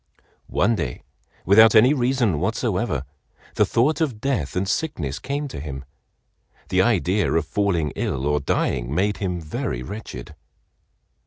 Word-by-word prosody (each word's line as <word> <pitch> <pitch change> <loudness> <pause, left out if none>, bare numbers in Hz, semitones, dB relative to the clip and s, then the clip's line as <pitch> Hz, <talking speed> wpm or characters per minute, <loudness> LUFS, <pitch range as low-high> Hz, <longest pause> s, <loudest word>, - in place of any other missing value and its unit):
One 110 +6 +2
day, 65 - -4 0.4
without 110 +3 +7
any 125 +6 +7
reason 120 - +1
whatsoever, 95 - -1 0.5
the - - +2
thought 145 +8 +1
of 130 -9 -1
death 115 - -2
and 95 +1 0
sickness 85 - -2
came 145 +2 -3
to 75 - -7
him. 70 -2 -7 0.8
The 95 0 +3
idea 100 -2 +2
of 80 -1 +1
falling 85 -3 0
ill 65 0 -2
or 75 0 +1
dying 65 -3 -1
made 100 +3 +1
him 90 -3 -2
very 65 -5 -4
wretched. 65 - -8
95 Hz, 140 wpm, -23 LUFS, 75-115 Hz, 0.8 s, without